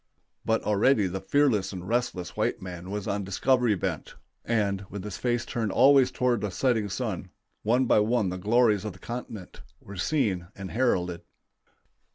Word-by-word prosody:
But 110 0 +1
already 105 +2 +3
the 95 +1 -3
fearless 140 -9 +2
and 90 -2 -7
restless 110 -6 -2
white - - 0
man 90 -1 -8
was 105 0 -4
on 100 0 -1
discovery 120 +4 +2
bent, 90 -6 -4 0.3
and, 100 -4 0
with 100 -1 -6
his 105 -1 -6
face 120 -1 -1
turned 110 -4 -2
always 135 +2 +6
toward 125 -2 0
the 105 - -1
setting 110 0 0
sun, 95 -4 -4 0.3
one 125 +4 +2
by 110 - +4
one 110 -1 +1
the 90 0 -5
glories 110 0 +3
of 105 -3 -4
the - - -14
continent 115 -3 -7 0.2
were 100 0 -11
seen 95 - 0
and 100 -1 -7
heralded. 90 -8 0
105 Hz, 170 wpm, -27 LUFS, 95-120 Hz, 0.3 s, always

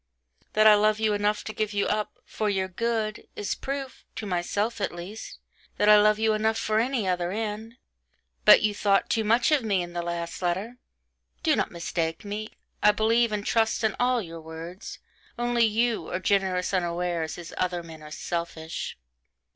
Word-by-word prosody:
That 215 0 +4
I 215 - +10
love 215 +1 +3
you 220 -1 +2
enough 205 +1 0
to 215 - -6
give 215 -1 -2
you 200 0 +1
up 210 0 -2
'for 215 -1 -2
your 190 -2 0
good,' 220 +2 -2
is 205 - -2
proof 275 -1 -5
(to 225 - -5
myself 205 +4 -1
at - - 0
least) 190 +6 -8 0.4
that 210 - +2
I 210 0 +8
love 210 0 +4
you 220 0 +2
enough 220 +1 +1
for 215 -1 +1
any 240 -3 0
other 180 -1 0
end: 220 +2 -4 0.7
but - - +8
you 210 -1 +2
thought 200 -1 +2
too 225 - +2
much 230 +5 +3
of 300 -3 +4
me 200 -5 +1
in 175 0 -9
the 175 - -2
last 170 0 -4
letter. 190 +7 -2 0.7
Do 315 -4 +4
not - - 0
mistake 170 +1 -3
me. 210 +1 -4 0.3
I 210 - +7
believe 225 +2 +2
and 210 -1 -2
trust 225 0 +1
in 220 - +1
all 245 -2 +2
your 165 -2 -9
words 165 +4 -8 0.4
only 240 -1 +2
you 230 +1 0
are - - -2
generous 190 -1 +1
unawares, 175 -2 -1
as 175 -1 -9
other 180 -1 -1
men 160 -2 -11
are 150 - -10
selfish. 165 - -4
210 Hz, 185 wpm, -26 LUFS, 175-220 Hz, 0.7 s, I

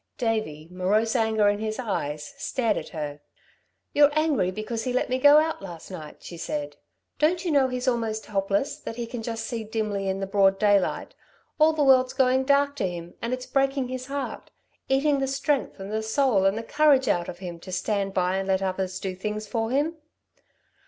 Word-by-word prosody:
Davey, 215 - -2
morose 205 +6 +1
anger 220 -3 +3
in 205 0 +2
his 215 0 -3
eyes, 150 - -3
stared 235 -6 0
at - - -5
her. 150 -3 -5 0.7
"You're 290 -1 +6
angry 310 - +2
because 215 +4 -4
he 250 - -2
let 250 - 0
me 255 - +1
go 290 +2 +8
out 315 -4 +1
last 175 -2 -9
night," 155 -5 -9
she 170 - -8
said. 290 - -4 0.4
"Don't 345 +4 +2
you 340 - +1
know 275 -3 +4
he's 250 0 -4
almost 225 -3 0
helpless, 240 +9 -1
that 225 - -6
he 240 0 -3
can 235 0 -6
just 225 0 -4
see 230 -2 -4
dimly 210 -3 -2
in 190 0 -1
the 195 - -2
broad 195 0 +3
daylight. 205 -2 +1 0.5
All 310 +1 +6
the 310 -2 0
world's 260 -2 +5
going 260 0 +3
dark 280 +1 +3
to 195 - 0
him, 175 -1 -7
and 235 - -3
it's 255 0 -3
breaking 270 -1 0
his 255 0 -5
heart 280 0 -5 0.4
eating 275 +1 +3
the 270 - 0
strength 275 -2 -1
and 195 +1 -6
the 220 - 0
soul 220 -3 +2
and 195 +2 +3
the 230 - -3
courage 285 0 +3
out 175 -1 +1
of 175 - -7
him, 175 -2 -7
to 185 +2 -10
stand 200 +1 -1
by 185 0 +1
and 195 0 -2
let 190 0 +1
others 185 0 -2
do 190 -1 -3
things 210 +3 -4
for 225 +1 -2
him." 295 +6 0
225 Hz, 205 wpm, -26 LUFS, 195-270 Hz, 0.7 s, go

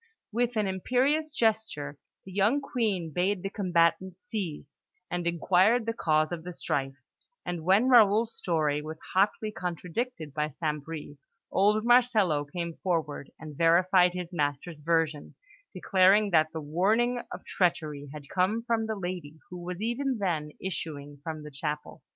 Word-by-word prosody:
With 240 +2 0
an 210 - +2
imperious 255 - +1
gesture, 220 - -1 0.3
the 190 - -10
young 205 +8 +2
Queen 210 - -2
bade 185 +2 0
the 195 - -3
combatants 180 -1 +1
cease, 165 -9 -5 0.3
and 175 -1 -2
inquired 185 +7 +3
the 230 - -1
cause 155 -6 +1
of 170 -2 -4
the 180 - -6
strife; 135 -5 -2 0.5
and 175 -2 -4
when 195 +8 +4
Raoul's 225 -2 +5
story 155 -4 0
was 155 +1 -7
hotly 205 +3 +2
contradicted 175 - -4
by 150 +1 -1
St. 150 -1 -3
Bris, 150 -2 -8 0.3
old 210 +3 +3
Marcello 220 - +4
came 170 +2 -5
forward 160 -6 -2
and 155 -2 -9
verified 180 +3 +4
his 180 -1 -5
master's 150 +1 -2
version, 160 -2 0 0.4
declaring 195 +2 +4
that 155 -2 +4
the 160 - -5
warning 215 +11 +1
of - - -8
treachery 155 -6 -1
had 145 -1 -9
come 195 +7 0
from 230 -2 0
the 220 - -2
lady 175 -5 -5
who 180 -1 -7
was 180 +3 -5
even 255 +3 -1
then 170 -7 -1
issuing 145 -5 -5
from 155 -1 -5
the 150 - -9
chapel. 150 +1 -5
180 Hz, 150 wpm, -28 LUFS, 155-215 Hz, 0.5 s, Raoul's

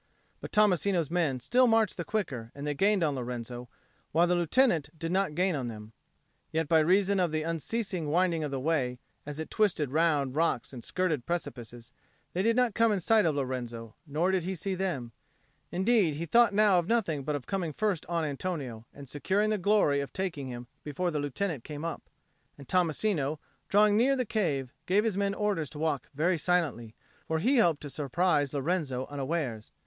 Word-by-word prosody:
But - - -8
Tommasino's 190 - +2
men 160 -7 +1
still 250 - +3
marched 225 -3 +3
the 175 - -4
quicker, 140 - -3
and 140 +1 -6
they 150 - 0
gained 195 +5 +2
on 150 -3 +1
Lorenzo, 120 -1 -5 0.4
while 170 +3 +4
the 175 - +1
Lieutenant 175 - +2
did 165 +2 -3
not 190 -4 0
gain 180 0 +2
on 130 -4 -3
them; 110 -1 -9 0.6
yet 160 -1 0
by 160 0 +5
reason 190 +4 +3
of 175 -3 +1
the 155 0 -1
unceasing 165 +1 -2
windings 170 -1 +1
of - - -3
the 135 -1 -3
way, 130 -4 0 0.3
as 145 0 -5
it 160 - -6
twisted 175 -10 +1
round 150 -4 +1
rocks 160 -6 0
and 120 -3 -8
skirted 165 -9 -1
precipices, 120 -9 -5 0.4
they 180 - 0
did 230 +3 +2
not 250 -3 +2
come 230 +1 +3
in 205 - +1
sight 215 +1 +3
of 155 - +1
Lorenzo, 120 -4 -4
nor 160 +6 +1
did 190 -1 +1
he 190 +2 -3
see 190 +3 -3
them; 175 -11 -3 0.6
indeed 190 -4 +2
he 165 +3 -3
thought 235 +5 +5
now 205 -2 +4
of 170 - -3
nothing 190 -11 0
but 150 +2 -1
of 140 - -5
coming 185 -5 -2
first 205 0 -1
on 170 -1 -1
Antonio, 140 -7 -4
and 140 - -11
of 135 - -11
securing 195 +9 0
the 215 - 0
glory 185 -7 +3
of 140 - -4
taking 175 -8 -3
him 120 -1 -7 0.2
before 175 +5 -2
the 150 - -1
Lieutenant 145 0 -2
came 150 +1 -6
up. 165 - -5 0.5
And 140 - -12
Tommasino, 165 -4 +1 0.3
drawing 210 +1 +5
near 265 +4 +4
the 255 -2 -1
cave, 145 - -1
gave 200 +3 +3
his 225 -4 0
men 200 0 0
orders 200 -9 -1
to 150 - -10
walk 150 -3 -1
very 170 +3 +1
silently; 145 -11 0 0.3
for 160 - 0
he 245 - +3
hoped 170 -9 +3
to 145 - -6
surprise 150 0 +1
Lorenzo 140 -3 -1
unawares. 140 -6 -3
165 Hz, 195 wpm, -29 LUFS, 140-190 Hz, 0.6 s, by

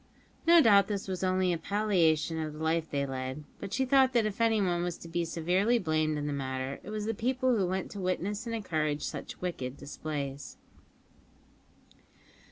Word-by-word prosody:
No 340 0 +8
doubt 200 -6 +6
this 200 -2 -3
was 185 -1 -3
only 185 -1 +2
a 170 - -2
palliation 165 -5 +1
of 155 -1 -3
the 155 +1 -6
life 160 0 0
they 140 -1 -1
led, 130 +2 -4 0.2
but 195 - -6
she 265 - +1
thought 265 0 +4
that 235 -3 +3
if 215 +1 -3
anyone 200 -6 +2
was 175 -1 -2
to - - -11
be 170 +1 -1
severely 180 +8 +1
blamed 155 -5 0
in 145 - -3
the 145 - -2
matter 130 0 -3
it - - -10
was 215 -1 -3
the 225 - 0
people 255 +3 +1
who 195 -4 +1
went 185 +1 -2
to 205 - -7
witness 195 +5 -2
and 230 - -2
encourage 155 -8 -1
such - - -5
wicked 140 -7 -4
displays. 140 -2 -5
180 Hz, 185 wpm, -30 LUFS, 155-210 Hz, 0.2 s, No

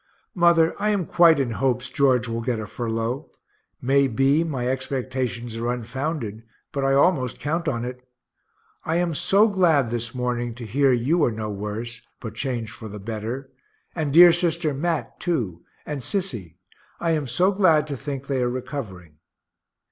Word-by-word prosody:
Mother, 170 -2 +4
I 210 - +2
am 200 -4 +1
quite 165 -3 +5
in 130 -4 0
hopes 125 +1 0
George 130 -4 +2
will 115 0 -3
get 115 -1 -1
a 110 - -4
furlough 115 +5 -3 0.5
may 135 +2 +3
be 135 +6 +2
my 135 -7 -2
expectations 130 -3 -2
are 120 +1 -1
unfounded, 125 -1 -4 0.3
but 140 -2 -2
I 135 0 +3
almost 135 -4 +2
count 165 +3 -2
on 120 -5 -1
it. 125 0 -6 0.8
I 160 - -1
am 175 -1 +1
so 195 +7 +4
glad 165 - +2
this 120 +1 -3
morning 120 -2 -2
to 120 -1 -8
hear 135 +5 +2
you 135 +7 +2
are 120 - +3
no 110 -1 -4
worse, 105 +3 -5 0.2
but 115 -3 -7
changed 115 -2 -3
for 110 - -9
the 105 0 -8
better 115 +6 -5 0.4
and 155 -4 -2
dear 175 +3 +9
sister 170 -3 0
Mat 160 +3 -2
too, 110 - -2 0.2
and 145 -2 -4
Sissy, 120 - -3 0.4
I 170 -1 0
am 150 -4 0
so 180 +11 +2
glad 175 -7 +4
to 145 -2 -4
think 140 0 -5
they 135 -2 -1
are 125 - +1
recovering. 100 - -6
130 Hz, 170 wpm, -24 LUFS, 115-160 Hz, 0.8 s, dear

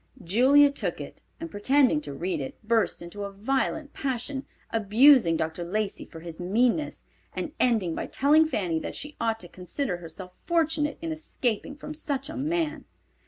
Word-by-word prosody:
Julia 265 +10 +5
took 280 - -3
it, - - -9 0.2
and 330 0 -6
pretending 255 - +3
to 145 -1 -7
read 170 0 -2
it, 135 - -6
burst 225 -6 +1
into 185 +4 -7
a 200 - -5
violent 270 +8 -1
passion, 265 +1 -3 0.2
abusing 225 - +5
Dr. 160 +2 -2
Lacey 205 +4 -2
for 165 - -11
his 165 0 -8
meanness, 235 - +1 0.3
and 310 - -3
ending 220 -9 +2
by - - -4
telling 305 +3 +4
Fanny 180 - -1
that - - -6
she 295 0 -6
ought 225 -1 0
to 175 - -8
consider 180 +4 -4
herself 175 +2 -9
fortunate 320 -3 +1
in 330 - -2
escaping 280 -5 -2
from 305 +1 -7
such 285 -2 -3
a - - -7
man. 315 +2 -1
235 Hz, 165 wpm, -27 LUFS, 180-290 Hz, 0.3 s, Julia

